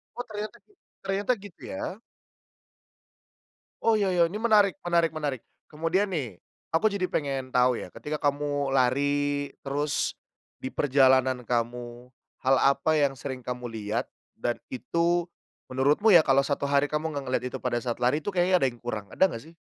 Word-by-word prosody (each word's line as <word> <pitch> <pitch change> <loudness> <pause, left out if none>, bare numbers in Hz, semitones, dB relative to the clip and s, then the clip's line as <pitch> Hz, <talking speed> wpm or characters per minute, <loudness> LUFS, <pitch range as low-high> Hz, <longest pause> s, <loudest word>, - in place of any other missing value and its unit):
Oh, 245 - -4
ternyata 210 0 -5
gi 415 - -28 0.3
ternyata 195 +4 0
gitu 200 -4 -13
ya? 285 -7 -5 1.8
Oh, 225 - +3
ya 205 -3 +2
ya 175 -2 +4
ini 200 +6 -4
menarik 210 -4 +5
menarik 170 -2 +2
menarik. 145 -6 -3 0.3
Kemudian 165 +6 0
nih, 125 - -4 0.3
aku 215 +7 +4
jadi 200 -3 -1
pengen 135 -6 -3
tahu 125 -1 +4
ya, - - -8
ketika 150 +1 -4
kamu 145 -1 -1
lari 145 +2 +1
terus 145 +1 -1 0.4
diperjalanan 130 -2 +2
kamu, 120 +1 -3 0.3
hal 135 +1 +4
apa 140 +3 +3
yang 140 -2 +2
sering 130 -2 -7
kamu 125 -1 -4
lihat 110 -2 -3 0.2
dan 120 - -2 0.2
itu 170 +5 0 0.4
menurutmu 145 +11 +3
ya 170 -5 +7
kalau 135 -1 +4
1 140 0 -1
hari 140 +1 +2
kamu 155 +1 -2
enggak 140 -1 -3
ngelihat 125 -1 0
itu 130 - -2
pada 125 -2 0
saat 120 0 -3
lari 125 +4 +3
itu 195 +6 -4
kayaknya 180 0 +3
ada - - +4
yang 120 - -17
kurang, 110 -4 -4
ada 190 - +4
enggak 115 +5 -7
sih? - - -33
145 Hz, 165 wpm, -27 LUFS, 130-175 Hz, 1.8 s, ya